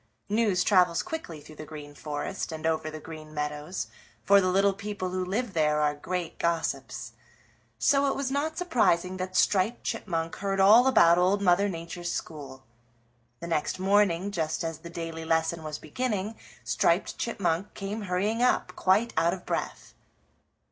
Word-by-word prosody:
News 205 Hz, -4 st, +2 dB
travels 180 Hz, -4 st, +3 dB
quickly 320 Hz, -, -6 dB
through 155 Hz, +1 st, -14 dB
the -, -, -7 dB
Green 150 Hz, -2 st, -9 dB
Forest 150 Hz, +5 st, -4 dB
and 160 Hz, 0 st, -6 dB
over 160 Hz, -1 st, 0 dB
the 155 Hz, 0 st, -7 dB
Green 155 Hz, -1 st, -10 dB
Meadows, 150 Hz, +4 st, -3 dB, 0.4 s
for 200 Hz, 0 st, +6 dB
the 185 Hz, -, +1 dB
little 195 Hz, +2 st, +3 dB
people 200 Hz, -2 st, -4 dB
who 185 Hz, 0 st, -1 dB
live 205 Hz, +4 st, -2 dB
there 150 Hz, -2 st, +2 dB
are 150 Hz, -1 st, +2 dB
great 170 Hz, +3 st, -4 dB
gossips. 170 Hz, -1 st, -2 dB, 0.7 s
So 280 Hz, -1 st, +3 dB
it 270 Hz, -, 0 dB
was 275 Hz, -1 st, -2 dB
not 305 Hz, +3 st, -1 dB
surprising 185 Hz, -, +1 dB
that 185 Hz, 0 st, -5 dB
Striped 200 Hz, +5 st, +2 dB
Chipmunk 165 Hz, -4 st, -3 dB
heard 195 Hz, 0 st, -2 dB
all 215 Hz, +6 st, +7 dB
about 170 Hz, -9 st, +6 dB
Old 185 Hz, +3 st, +3 dB
Mother 195 Hz, +2 st, +4 dB
Nature's 170 Hz, 0 st, -5 dB
school. 135 Hz, -4 st, -6 dB, 0.8 s
The -, -, -5 dB
next 160 Hz, 0 st, -1 dB
morning, 195 Hz, -1 st, +2 dB
just 160 Hz, -5 st, -2 dB
as 165 Hz, -1 st, -4 dB
the 170 Hz, -, -10 dB
daily 165 Hz, -1 st, -5 dB
lesson 160 Hz, 0 st, 0 dB
was 155 Hz, -1 st, -5 dB
beginning, 210 Hz, +4 st, -3 dB, 0.3 s
Striped 120 Hz, -, +1 dB
Chipmunk 195 Hz, -4 st, -1 dB
came 205 Hz, +2 st, -4 dB
hurrying 205 Hz, +6 st, 0 dB
up, 250 Hz, -, +2 dB
quite 205 Hz, +5 st, +2 dB
our 170 Hz, +3 st, +3 dB
of 180 Hz, -, -14 dB
breath. -, -, -4 dB
180 Hz, 160 wpm, -28 LUFS, 160-200 Hz, 0.8 s, all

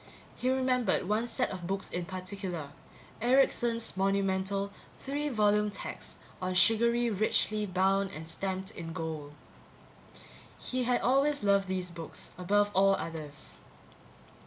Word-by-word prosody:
He 255 Hz, -, -1 dB
remembered 255 Hz, -7 st, +1 dB
one 215 Hz, +4 st, +1 dB
set -, -, 0 dB
of 180 Hz, -3 st, -5 dB
books 195 Hz, +1 st, -2 dB
in 175 Hz, 0 st, -2 dB
particular 185 Hz, -4 st, -5 dB, 0.5 s
Erickson's 240 Hz, -3 st, +2 dB
monumental 195 Hz, 0 st, 0 dB, 0.3 s
three 290 Hz, +2 st, -2 dB
volume 210 Hz, -3 st, +3 dB
text 200 Hz, -, -7 dB, 0.3 s
on 185 Hz, 0 st, -1 dB
surgery, 235 Hz, +4 st, +4 dB
richly 215 Hz, +1 st, +1 dB
bound 195 Hz, +1 st, +2 dB
and 160 Hz, 0 st, -8 dB
stamped 190 Hz, +3 st, -3 dB
in 165 Hz, -5 st, -7 dB
gold. 160 Hz, -4 st, -5 dB, 1.3 s
He 255 Hz, -1 st, -1 dB
had 245 Hz, 0 st, +2 dB
always 275 Hz, +1 st, +2 dB
loved 200 Hz, -1 st, +3 dB
these 185 Hz, -1 st, -2 dB
books, 165 Hz, -2 st, -7 dB
above 205 Hz, +3 st, +2 dB
all 195 Hz, +1 st, +5 dB
others. 155 Hz, -5 st, -7 dB
195 Hz, 125 wpm, -31 LUFS, 185-230 Hz, 1.3 s, all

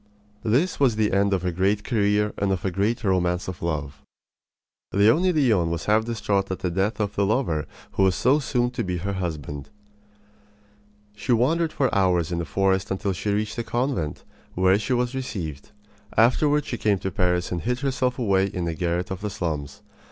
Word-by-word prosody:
This 135 Hz, +12 st, +1 dB
was 130 Hz, -6 st, +3 dB
the 110 Hz, -1 st, +1 dB
end 100 Hz, +1 st, +3 dB
of 95 Hz, -2 st, 0 dB
a 90 Hz, -, +1 dB
great 100 Hz, +4 st, +1 dB
career 105 Hz, -2 st, +1 dB
and 100 Hz, -1 st, +1 dB
of 95 Hz, -1 st, -2 dB
a 95 Hz, -, 0 dB
great 105 Hz, +6 st, 0 dB
romance 90 Hz, -2 st, +1 dB
of 95 Hz, -2 st, -6 dB
love. 75 Hz, -4 st, -3 dB, 0.9 s
Leonie 115 Hz, -, +4 dB
Leon 115 Hz, -, +2 dB
was 85 Hz, -1 st, -3 dB
half 110 Hz, +1 st, +3 dB
distraught 105 Hz, -4 st, -1 dB
at 95 Hz, -, -2 dB
the 90 Hz, -, -2 dB
death 95 Hz, +6 st, 0 dB
of 105 Hz, -1 st, -1 dB
the 100 Hz, -, +2 dB
lover 100 Hz, -, 0 dB, 0.2 s
who -, -, -1 dB
was 95 Hz, -1 st, +4 dB
so 135 Hz, +5 st, +3 dB
soon 125 Hz, -3 st, 0 dB
to 125 Hz, -1 st, -3 dB
be 90 Hz, -1 st, -2 dB
her 100 Hz, +4 st, -3 dB
husband. 75 Hz, -6 st, -5 dB, 1.5 s
She 120 Hz, +4 st, 0 dB
wandered 155 Hz, +8 st, +2 dB
for 135 Hz, -4 st, 0 dB
hours 90 Hz, -4 st, +2 dB
in 85 Hz, -, -1 dB
the 85 Hz, -, -2 dB
forest 95 Hz, +1 st, +1 dB
until 95 Hz, +1 st, -1 dB
she 100 Hz, +3 st, -3 dB
reached 105 Hz, +3 st, -1 dB
a -, -, -1 dB
convent, 120 Hz, -, -2 dB, 0.3 s
where 95 Hz, +2 st, +4 dB
she 110 Hz, +4 st, -1 dB
was 125 Hz, 0 st, 0 dB
received. 90 Hz, -, -5 dB, 0.5 s
Afterward 145 Hz, +6 st, +4 dB
she 120 Hz, -, -4 dB
came 105 Hz, -2 st, +2 dB
to 95 Hz, +1 st, -4 dB
Paris 90 Hz, 0 st, 0 dB
and 90 Hz, -2 st, -2 dB
hid 125 Hz, +2 st, -2 dB
herself 130 Hz, -2 st, 0 dB
away 100 Hz, -6 st, +2 dB
in 90 Hz, -3 st, -3 dB
a 85 Hz, -, -1 dB
garret 90 Hz, +2 st, -2 dB
of 95 Hz, 0 st, -4 dB
the 105 Hz, -, -2 dB
slums. 75 Hz, -8 st, -4 dB
100 Hz, 195 wpm, -24 LUFS, 90-120 Hz, 1.5 s, Leonie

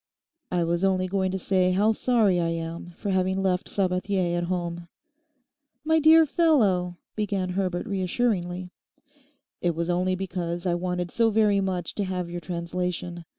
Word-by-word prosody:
'I 175 Hz, -1 st, +1 dB
was 170 Hz, +2 st, 0 dB
only 190 Hz, -1 st, +2 dB
going 190 Hz, 0 st, 0 dB
to 190 Hz, -, -2 dB
say 185 Hz, -1 st, +1 dB
how 205 Hz, +4 st, +3 dB
sorry 220 Hz, -5 st, +2 dB
I 170 Hz, -, +1 dB
am 165 Hz, +1 st, -4 dB
for 200 Hz, -, -3 dB
having 190 Hz, +1 st, +1 dB
left 180 Hz, -1 st, 0 dB
Sabathier 185 Hz, -1 st, 0 dB
at 175 Hz, 0 st, -1 dB
home.' 175 Hz, -1 st, -3 dB, 1.0 s
'My 320 Hz, +1 st, +3 dB
dear 320 Hz, +1 st, +7 dB
fellow—' 210 Hz, -, +2 dB, 0.2 s
began 200 Hz, -3 st, -1 dB
Herbert 180 Hz, -1 st, -1 dB
reassuringly. 185 Hz, -3 st, -1 dB, 0.9 s
'It 175 Hz, -2 st, 0 dB
was 170 Hz, +1 st, -1 dB
only 185 Hz, +1 st, +1 dB
because 175 Hz, -2 st, -4 dB
I 175 Hz, -, +2 dB
wanted 180 Hz, 0 st, -2 dB
so 230 Hz, -1 st, +3 dB
very 210 Hz, -2 st, +3 dB
much 185 Hz, -3 st, -2 dB
to 205 Hz, -, -2 dB
have 180 Hz, -2 st, -3 dB
your 175 Hz, 0 st, -5 dB
translation. 175 Hz, 0 st, -4 dB
185 Hz, 155 wpm, -26 LUFS, 175-195 Hz, 1.0 s, dear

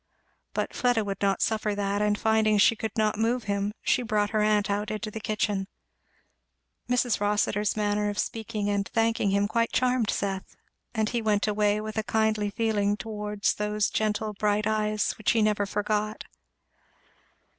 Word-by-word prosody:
But -, -, -2 dB
Fleda 245 Hz, -3 st, +2 dB
would 195 Hz, -1 st, -4 dB
not 195 Hz, -2 st, +2 dB
suffer 215 Hz, -2 st, 0 dB
that, 200 Hz, 0 st, -1 dB
and 210 Hz, 0 st, +2 dB
finding 220 Hz, -1 st, +3 dB
she 210 Hz, +3 st, +5 dB
could 220 Hz, 0 st, -5 dB
not 215 Hz, -1 st, +1 dB
move 235 Hz, +2 st, +1 dB
him 200 Hz, 0 st, -1 dB
she -, -, +2 dB
brought 210 Hz, -3 st, 0 dB
her 215 Hz, -1 st, +1 dB
aunt 210 Hz, -1 st, +2 dB
out 205 Hz, +1 st, -1 dB
into 215 Hz, 0 st, -4 dB
the 220 Hz, -, -5 dB
kitchen. 210 Hz, -2 st, -1 dB, 1.2 s
Mrs. 245 Hz, -2 st, +2 dB
Rossitur's 205 Hz, 0 st, +1 dB
manner 210 Hz, 0 st, +1 dB
of 205 Hz, -, -5 dB
speaking 220 Hz, -2 st, -2 dB
and 200 Hz, -1 st, 0 dB
thanking 225 Hz, -2 st, +1 dB
him 200 Hz, +1 st, +2 dB
quite 230 Hz, +2 st, 0 dB
charmed 250 Hz, -3 st, +1 dB
Seth, 195 Hz, -1 st, -3 dB, 0.4 s
and 220 Hz, -1 st, +1 dB
he 240 Hz, -1 st, -1 dB
went 210 Hz, -2 st, +1 dB
away 210 Hz, 0 st, +2 dB
with 215 Hz, 0 st, -4 dB
a -, -, -1 dB
kindly 220 Hz, -2 st, +1 dB
feeling 205 Hz, -1 st, 0 dB
towards 210 Hz, 0 st, -2 dB
those 210 Hz, 0 st, -1 dB
gentle 215 Hz, 0 st, -1 dB
bright 210 Hz, 0 st, 0 dB
eyes 215 Hz, -1 st, +1 dB
which 215 Hz, -, +2 dB
he 225 Hz, -, +2 dB
never 210 Hz, -1 st, +1 dB
forgot. 210 Hz, +1 st, -1 dB
210 Hz, 165 wpm, -27 LUFS, 205-220 Hz, 1.2 s, she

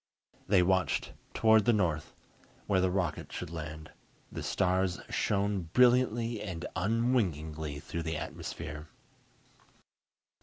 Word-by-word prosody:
They 95 Hz, -2 st, +5 dB
watched 95 Hz, 0 st, +1 dB, 0.2 s
toward 110 Hz, -1 st, +5 dB
the 120 Hz, -, +5 dB
north, 80 Hz, -7 st, 0 dB, 0.5 s
where 95 Hz, -3 st, +2 dB
the 95 Hz, -, +2 dB
rocket 90 Hz, -4 st, -2 dB
should -, -, -5 dB
land. 80 Hz, -1 st, -7 dB, 0.4 s
The -, -, -5 dB
stars 95 Hz, -1 st, +1 dB
shone 100 Hz, -4 st, 0 dB
brilliantly 120 Hz, -3 st, +3 dB
and 90 Hz, -5 st, -5 dB
unwinkingly 85 Hz, -, 0 dB
through 85 Hz, -, -4 dB
the 80 Hz, -1 st, -2 dB
atmosphere. 75 Hz, 0 st, -6 dB
95 Hz, 110 wpm, -31 LUFS, 80-105 Hz, 0.5 s, They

